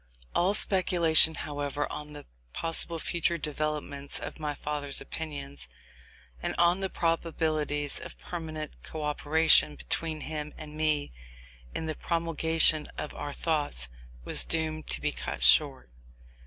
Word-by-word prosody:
All 190 +4 +3
speculation, 170 -5 +5
however, 145 -1 -2
on 150 0 -7
the 145 - -9 0.3
possible 165 0 0
future 170 +1 0
developments 150 -2 -3
of - - -7
my 150 -1 -2
father's 145 -2 -2
opinions, 140 -3 -6 0.7
and - - -2
on 175 +2 +4
the 190 -1 -1
probabilities 155 -4 0
of - - -9
permanent 155 -3 -6
co 155 -1 -6
operation 150 - +4
between 155 - -2
him 150 -1 -5
and 155 -1 -9
me 155 - 0 0.6
in 160 - -2
the 155 - -1
promulgation 165 -1 +2
of 150 - -4
our 145 - -5
thoughts, 145 - -1 0.4
was - - +3
doomed 155 -1 -1
to - - -3
be - - +1
cut - - -4
short. 60 -1 +4
155 Hz, 130 wpm, -29 LUFS, 145-165 Hz, 0.7 s, speculation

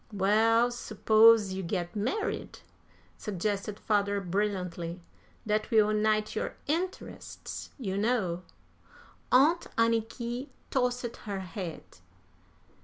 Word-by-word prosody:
"Well, 220 +4 +3
suppose 220 -2 +4
you 190 - -3
get 175 +1 -3
married?" 255 - -2 0.6
suggested 205 +1 -2
father, 205 -2 +1
brilliantly. 180 -3 -2 0.4
"That 215 0 0
will 215 -2 +4
unite 215 0 +1
your - - -2
interests, 345 +5 -4
you 200 -7 -2
know." 205 -6 0 0.9
Aunt 300 +7 +5
Anniky 230 +3 0 0.2
tossed 250 -1 0
her 200 -3 -5
head. 180 -2 -6
215 Hz, 95 wpm, -29 LUFS, 195-235 Hz, 0.9 s, Aunt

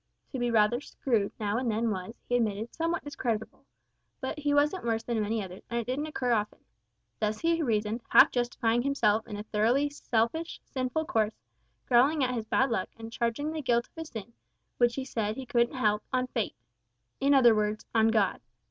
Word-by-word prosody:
To 265 - -4
be 245 0 +1
rather 230 +2 +3
"screwed" 230 -8 -1
now 210 +1 0
and 255 -2 -1
then 225 +1 0
was, 190 +3 -5
he 245 - +1
admitted, 220 -1 -1
somewhat 335 +1 -1
discreditable; 230 -6 -4 0.5
but 260 +2 -4
he 290 -1 0
wasn't 295 +6 +2
worse 225 -1 0
than 230 -2 -1
many 215 +1 -1
others, 185 0 -9
and 235 - -1
it 235 - -3
didn't 275 +6 -2
occur 255 -5 -1
often. 210 -2 0 0.6
Thus 215 0 -1
he 335 0 +2
reasoned, 220 -3 0
half - - +7
justifying 240 -1 +1
himself 230 -5 +1
in 210 - -6
a 205 - -5
thoroughly 235 +7 +1
selfish, 285 +5 -1
sinful 260 +4 -2
course; 220 -9 0 0.5
growling 270 +4 +4
at 255 0 +1
his 225 -3 -3
"bad 260 +3 +2
luck," 190 -5 -1
and 225 0 -9
charging 235 +7 -1
the 315 -1 -3
guilt 235 -3 +1
of - - -46
his 325 -1 -7
sin, 225 +1 -8 0.5
which 240 -1 +3
he 270 - -3
said 220 -5 -2
he 265 - -6
couldn't 240 +1 +1
help, 210 -4 +1
on 255 0 +1
Fate 235 -4 -3 0.6
in 275 +1 +4
other 240 -4 +7
words, 210 0 -1
on 225 -1 +4
God. 215 -4 +2
235 Hz, 195 wpm, -29 LUFS, 220-265 Hz, 0.6 s, half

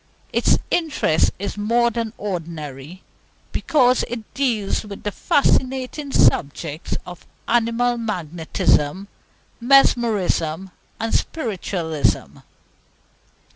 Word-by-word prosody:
Its - - +3
interest 295 - +2
is 200 +2 -5
more 235 +3 +2
than 230 -1 -3
ordinary, 165 -4 -6 0.5
because 255 -4 +3
it 230 -3 -7
deals 235 -8 0
with 205 -2 -9
the 205 - -2
fascinating 265 +4 0
subjects 150 - +1
of 180 -1 -11 0.2
Animal 240 +1 +1
Magnetism, 175 -3 0 0.5
Mesmerism, 210 - +2 0.3
and 225 0 -2
Spiritualism. 170 - -1
210 Hz, 85 wpm, -21 LUFS, 170-240 Hz, 0.5 s, Its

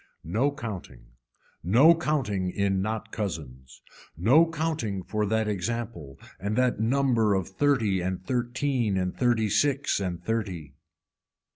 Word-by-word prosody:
No 115 - +1
counting, 95 - -8 0.5
no 125 - +6
counting 130 - -1
in 95 0 0
not 110 +2 -3
cousins, 65 - -6 0.3
no 135 - +5
counting 155 - -2
for 105 +2 -1
that 110 +1 0
example 105 - -4 0.2
and 100 +3 -2
that 125 -3 +1
number 115 -3 +2
of 95 -3 -1
thirty 110 -4 +1
and 95 +1 -3
thirteen 120 -2 0
and 90 -1 -1
thirty 120 -3 +2
six 140 +5 +1
and 90 -3 -3
thirty. 95 -11 -3
110 Hz, 125 wpm, -27 LUFS, 95-125 Hz, 0.5 s, no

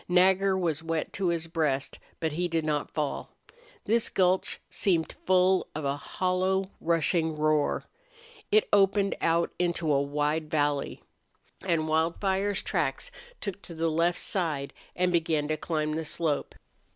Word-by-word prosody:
Nagger 190 +2 +4
was 165 -5 -1
wet 165 -1 -2
to 195 -2 -1
his 170 -1 0
breast, 150 -5 -1 0.2
but 160 -2 -1
he 175 +4 -1
did 165 -2 -1
not 150 -2 -1
fall. 150 -2 -3 0.6
This 230 +1 +2
gulch 185 0 +1
seemed 170 -5 0
full 185 0 +4
of 155 -1 -3
a 140 0 0
hollow 185 +5 -1
rushing 165 0 +1
roar. 155 -1 +1 0.7
It 215 0 +4
opened 200 0 +4
out 170 +1 +2
into 170 -3 +1
a 140 - +3
wide 150 +2 -1
valley. 145 -2 0 0.6
And 165 -4 +1
Wildfire's 190 +5 0
tracks - - -1 0.3
took 200 -1 -5
to 170 - -10
the 165 +1 0
left 170 +2 +2
side 155 -8 -2 0.2
and 180 0 +1
began 160 -3 +1
to 155 - +1
climb 155 0 -2
the 160 +1 -2
slope. 155 -1 -2
165 Hz, 145 wpm, -28 LUFS, 155-185 Hz, 0.7 s, Nagger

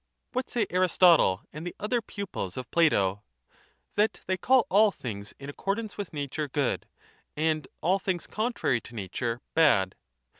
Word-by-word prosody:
What 255 0 -2
say 235 -3 +1
Aristotle 175 - +4
and 155 - -7
the - - -6
other 230 +3 0
pupils 200 - -5
of 125 -2 -6
Plato? 100 - +3 0.7
That 210 +2 +1
they 185 - +1
call 250 +7 +4
all 210 +3 +5
things 105 - -7
in 140 - -9
accordance 200 +9 -3
with 205 -3 -5
nature 145 0 -3
good 140 -1 -1 0.5
and 155 -2 0
all 185 +5 +2
things 185 -3 -2
contrary 215 - 0
to 120 - -12
nature 115 +4 -3
bad. 120 -13 +4
160 Hz, 150 wpm, -28 LUFS, 125-200 Hz, 0.7 s, all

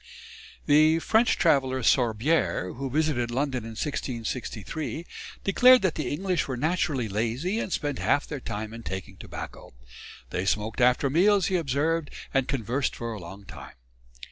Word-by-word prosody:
The 155 +2 +5
French 220 +7 +2
traveller, 130 -5 +2
Sorbière, 115 - +1
who 135 +2 -4
visited 145 -4 0
London 130 0 -1
in 115 - -7
1663, 130 - -4 0.4
declared 250 +5 +6
that 185 -4 +2
the 145 -6 -3
English 180 +3 -1
were 130 -2 -3
naturally 150 -4 0
lazy 120 - -1
and 195 - -3
spent 145 -4 -2
half 145 - +2
their 150 - -5
time 110 -2 -5
in 115 - -8
taking 95 -4 -6
tobacco. - - -9 0.6
They 90 +1 -2
smoked 105 +3 -1
after 125 +3 +4
meals, 195 +4 +4
he 190 - 0
observed, 160 0 0 0.2
and 135 -1 +2
conversed 130 +1 -1
for 115 -1 -4
a 105 - -7
long 95 +4 -10
time. - - -11
135 Hz, 150 wpm, -26 LUFS, 115-160 Hz, 0.6 s, declared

